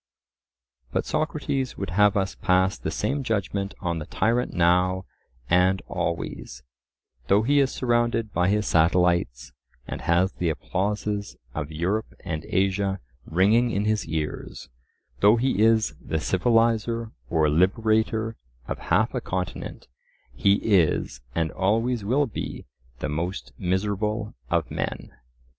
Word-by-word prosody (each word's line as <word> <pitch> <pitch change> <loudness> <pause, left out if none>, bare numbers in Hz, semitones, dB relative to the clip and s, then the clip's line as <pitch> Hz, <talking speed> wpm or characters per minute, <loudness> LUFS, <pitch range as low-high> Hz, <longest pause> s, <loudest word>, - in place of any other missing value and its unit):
But - - -1
Socrates 140 -4 -2
would 95 -3 -4
have 105 +3 +4
us 95 0 0
pass 95 +1 +2
the - - -4
same 135 +7 -1
judgment 100 -4 -2
on 85 -3 -1
the 75 - -7
tyrant 120 +3 +1
now 90 +2 +2 0.4
and 90 +3 +3
always; 85 -7 -4 0.6
though 100 +6 +4
he 145 +5 +3
is 135 -1 +3
surrounded 120 -3 0
by 90 +2 +2
his 105 0 +1
satellites, 85 -6 +2 0.4
and - - -5
has 90 +3 +2
the 85 - -1
applauses 100 +4 -2 0.2
of 75 0 -4
Europe 90 +8 -2
and 80 -4 -4
Asia 95 0 +1 0.3
ringing 105 +8 +3
in 105 -2 -1
his 110 -3 0
ears; 80 -1 -4 0.5
though 105 +3 +6
he 120 -3 +1
is 110 0 +4
the 80 - -1
civilizer 115 - +1 0.2
or 80 -3 +3
liberator 110 +6 +1 0.3
of - - -4
half - - +3
a - - -2
continent, 90 -1 -5 0.5
he 100 +10 +3
is, 85 - +2
and 80 -1 0
always 115 +4 0
will 130 +8 +2
be, 115 - -6 0.4
the - - -1
most 85 +6 -3
miserable 105 +3 -1 0.2
of - - 0
men. - - -4
100 Hz, 130 wpm, -25 LUFS, 90-110 Hz, 0.6 s, though